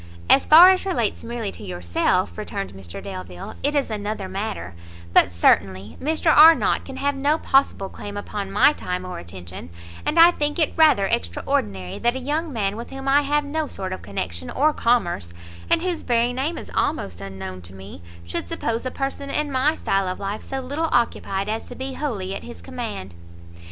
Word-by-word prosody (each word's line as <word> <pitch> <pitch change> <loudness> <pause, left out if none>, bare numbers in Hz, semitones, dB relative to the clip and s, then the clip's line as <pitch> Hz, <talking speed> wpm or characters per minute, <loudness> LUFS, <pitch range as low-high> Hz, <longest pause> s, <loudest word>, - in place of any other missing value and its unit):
"As 275 - +5
far 345 +4 +10
as 370 - +1
relates 245 - -1
merely 230 -3 -4
to - - -11
yourself," 85 -1 0
returned 95 +4 -5
Mr 95 0 -9
Delvile, 90 -1 -7
"it 290 +2 +1
is 280 -5 0
another 205 -2 -3
matter; 185 - -4 0.4
but - - +6
certainly 95 +3 +2
Mr 315 +2 +2
Arnott 320 +1 +6
can 265 -1 -8
have 285 +1 0
no 285 +3 +1
possible 270 -10 +2
claim 205 +1 -8
upon 205 -1 -5
my 210 +9 +5
time 180 -8 -4
or 180 - -6
attention; 85 -1 -9 0.3
and 320 - -1
I 335 +1 +9
think 295 -2 -2
it 315 -3 +1
rather 310 -12 +5
extraordinary, 90 - -2
that 240 +1 +1
a - - -2
young 300 +5 -2
man 205 -5 -1
with 235 +2 -7
whom 270 0 -7
I 280 +2 +5
have 290 +1 0
no 305 +1 -2
sort 190 -6 -5
of - - -7
connection 85 -4 -5
or 300 +3 +2
commerce, 175 - 0 0.3
and - - +3
whose 360 -3 -1
very 240 0 +1
name 280 +7 -2
is - - -8
almost 95 - -1
unknown 95 -1 -7
to 90 +2 -10
me, 95 -1 -11 0.2
should 85 0 -3
suppose 230 +2 -2
a - - -1
person 275 +2 -4
in 295 +1 -1
my 275 +4 +2
style 195 -8 0
of 185 - -4
life 200 +1 -4
so 270 0 -5
little 290 +5 -2
occupied 200 -5 0
as 220 +1 -3
to 245 - -9
be 265 +1 -5
wholly 210 -11 -3
at - - -5
his 240 - -10
command." 225 - -6
225 Hz, 190 wpm, -23 LUFS, -, 0.4 s, far